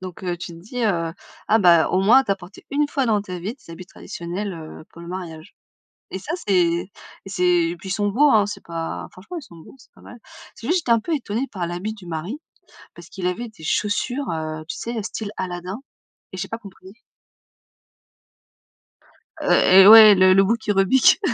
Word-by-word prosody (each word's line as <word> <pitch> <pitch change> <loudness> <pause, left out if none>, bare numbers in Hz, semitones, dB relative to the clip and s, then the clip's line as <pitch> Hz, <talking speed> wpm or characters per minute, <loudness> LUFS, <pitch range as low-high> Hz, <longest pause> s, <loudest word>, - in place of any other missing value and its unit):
Donc 185 0 -9
heu, 175 -1 -2
tu 175 - -7
te 165 - -12
dis, 235 +7 -6
heu: 165 -5 0 0.4
«Ah 220 +1 +4
bah, 170 -5 +5
au 185 - +1
moins 235 +7 +6
tu - - -4
as 195 - +3
porté 185 +1 -14
1 290 +1 0
fois 275 -2 -1
dans 215 -4 +1
ta 185 -3 -7
vie 195 +7 -5
tes 255 -10 -18
habits 180 +2 -10
traditionnels, 180 +4 -6
heu, 155 -1 -10
pour 170 - -13
le - - -10
mariage. 175 -1 -8 0.6
Et - - -5
ça, 290 - -6
c'est 200 - +1
et 175 +1 +1 0.4
c'est 190 -2 -2 0.3
et 175 - -6
puis 190 - -10
ils - - -2
sont 205 +1 0
beaux 280 +8 +3
hein, 215 -4 +4
c'est 210 - -7
pas 165 -1 -6
franchement 215 - -9
ils - - -10
sont 175 -10 -15
beaux, 160 - -15
c'est - - -21
pas - - -20
mal. 245 - -13 0.4
C'est 230 - -10
juste 350 +4 +2
j'étais 250 -7 +1
un 230 - +3
peu 325 +9 -2
étonnée 240 -2 -3
par 180 -4 -4
l'habit 180 +6 -5
du 200 - -14
mari, 170 - -5 0.6
parce 170 0 -13
qu'il 190 -2 -7
avait 180 +7 -2
des 215 -8 -16
chaussures, 245 - -1
heu, 155 -1 -4
tu - - -5
sais? 235 0 -5
Heu, - - -2
style 215 0 -5
Aladdin 180 +3 -5 0.5
et - - -7
j'ai - - -5
pas 225 - -4
compris. 190 -3 -14 2.5
Heu, - - +1
et 190 +1 +7
ouais 215 -1 +10
le 185 0 +5
le 195 0 +5
bout 230 +4 +1
qui 215 -2 -2
rebique, 200 - +4
195 Hz, 220 wpm, -22 LUFS, 175-225 Hz, 2.5 s, ouais